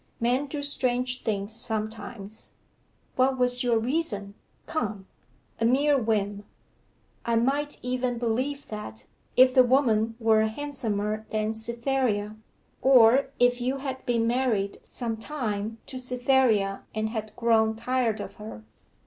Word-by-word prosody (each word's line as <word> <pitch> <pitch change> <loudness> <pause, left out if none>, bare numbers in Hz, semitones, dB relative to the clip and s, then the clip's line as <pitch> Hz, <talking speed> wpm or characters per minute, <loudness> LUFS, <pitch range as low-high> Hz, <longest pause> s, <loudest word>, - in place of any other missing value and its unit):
'Men 250 +5 +1
do 285 +1 -4
strange 255 -2 0
things 205 -1 -2
sometimes.' 215 -2 -6 0.6
'What 260 +1 +3
was 250 0 +3
your 240 -2 +2
reason 225 -5 -2 0.3
come?' 215 -10 -3 0.5
'A 225 - +1
mere 285 +5 +4
whim.' 205 -4 0 0.8
'I 235 - +1
might 280 +5 0
even 250 -1 -1
believe 255 +5 -2
that, 160 - -7 0.3
if 255 0 +7
the 260 - +7
woman 230 -4 +2
were 220 -1 +4
handsomer 220 -5 -3
than 215 0 -1
Cytherea, 235 -2 -1 0.5
or 260 0 +6
if 245 0 +3
you 260 +3 0
had 265 -1 -5
been 235 -2 +2
married 230 -5 0
some 230 -3 -3
time 225 -4 -3
to 260 - -6
Cytherea 250 -6 +2
and 220 0 -1
had 215 -1 -5
grown 220 -1 +3
tired 230 -1 0
of - - -7
her. 210 - -9
235 Hz, 130 wpm, -27 LUFS, 215-255 Hz, 0.8 s, if